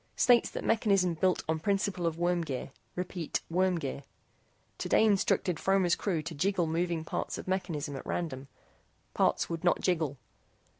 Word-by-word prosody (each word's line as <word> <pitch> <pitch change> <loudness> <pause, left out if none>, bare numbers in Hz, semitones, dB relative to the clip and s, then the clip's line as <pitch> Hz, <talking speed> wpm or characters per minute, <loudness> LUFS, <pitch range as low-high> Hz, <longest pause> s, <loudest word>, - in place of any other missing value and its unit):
STATES 245 -2 +4
THAT - - -5
MECHANISM 195 -6 +2
BUILT 185 +3 +1
ON 160 0 0
PRINCIPLE 195 -1 0
OF 165 -1 -2
WORM 175 0 +1
GEAR. 140 -3 -5 0.2
REPEAT. 180 -2 -3
WORM 185 +1 +2
GEAR. 140 -3 -4 0.8
TODAY - - +3
INSTRUCTED 190 -5 +2
FROMER'S 190 -3 +3
CREW 170 -6 -1
TO 165 +1 -5
JIGGLE 180 +3 +1
MOVING 165 0 -1
PARTS - - -3
OF - - -8
MECHANISM 165 -7 -2
AT 135 - -7
RANDOM. 140 -6 -3 0.7
PARTS - - +2
WOULD 165 0 -4
NOT 175 - +3
JIGGLE. 160 -6 0
175 Hz, 155 wpm, -30 LUFS, 160-190 Hz, 0.8 s, STATES